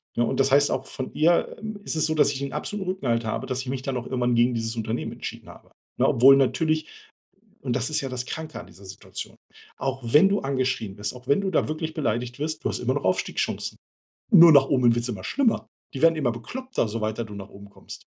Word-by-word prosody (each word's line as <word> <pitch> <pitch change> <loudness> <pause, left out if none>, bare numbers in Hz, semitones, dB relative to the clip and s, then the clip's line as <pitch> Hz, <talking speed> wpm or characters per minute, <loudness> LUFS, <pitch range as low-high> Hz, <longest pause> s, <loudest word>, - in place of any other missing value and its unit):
ne? 120 - +2
Und - - -2
das 135 0 +3
heißt 145 +1 +5
auch - - -2
von 130 - -6
ihr, 170 +3 +2
äh, 215 -1 -6
ist - - -3
es 155 - +2
so, 155 - 0
dass 150 - +4
ich 135 -1 -5
'n 140 - -4
absoluten 205 -3 -4
Rückenhalt 120 -11 -1
habe, 110 - -3
dass 130 -1 -2
ich 130 - -9
mich 130 0 -3
dann 135 -1 -3
auch 120 - -5
irgendwann 125 -2 0
gegen 120 +1 +3
dieses 115 0 -3
Unternehmen 115 +1 -3
entschieden - - -8
habe, - - -15 0.3
ne? - - +3
Obwohl 135 +3 +7
natürlich, 155 +3 +1 0.8
und 125 -2 -2
das 130 +3 -1
ist 155 - 0
ja 135 - -4
das 125 -1 -4
Kranke 160 -1 -6
an - - -11
dieser 100 - -15
Situation, 95 0 -9 0.4
auch 135 0 -3
wenn 150 +11 +5
du 200 +1 +1
angeschrien 130 -7 -2
bist, 105 +2 -4
auch 125 0 -13
wenn 140 +8 +3
du 195 - -1
da 170 - +1
wirklich 155 +1 -3
beleidigt 120 -4 -2
wirst, 155 +2 -4
du - - +1
hast - - -3
immer - - 0
noch - - -3
Aufstiegschancen. - - -1 0.6
Nur 170 -3 +10
nach 140 -1 +6
oben 125 -4 +4
wird's 120 +1 -2
immer 100 -6 -5
schlimmer. 265 -5 +1 0.3
Die 135 - -5
werden 165 0 +5
immer 140 -6 0
bekloppter, 250 - -4
so 110 +2 -4
weiter 110 +2 -2
du 105 - -10
nach 100 0 -8
oben 100 0 -13
kommst. - - -12
130 Hz, 240 wpm, -25 LUFS, 120-155 Hz, 0.8 s, Nur